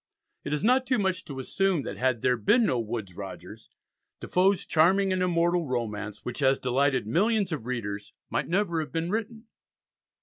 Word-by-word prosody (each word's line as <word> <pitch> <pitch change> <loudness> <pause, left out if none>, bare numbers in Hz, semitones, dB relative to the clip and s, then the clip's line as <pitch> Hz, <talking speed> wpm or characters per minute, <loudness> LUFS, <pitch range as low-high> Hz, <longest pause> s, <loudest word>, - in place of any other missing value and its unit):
It 145 - -5
is 150 +3 -1
not 255 +3 +3
too 255 0 +2
much 190 -3 -1
to 140 - -8
assume 180 +4 0
that - - -5
had 130 -3 0
there 125 0 +3
been 220 - +3
no 125 - +1
Woodes 110 -4 -4
Rogers, 95 +1 -9 0.5
Defoe's 190 +1 +2
charming 185 +4 +3
and 185 - -1
immortal 175 -1 +1
romance, 110 -4 -4
which 125 +2 -4
has 135 -1 +3
delighted 130 0 +1
millions 200 - +1
of 140 -7 -4
readers, 105 -5 -4 0.2
might - - -2
never 175 -2 0
have 155 - -4
been 165 +2 -2
written. 225 +1 -3
155 Hz, 175 wpm, -27 LUFS, 125-195 Hz, 0.5 s, not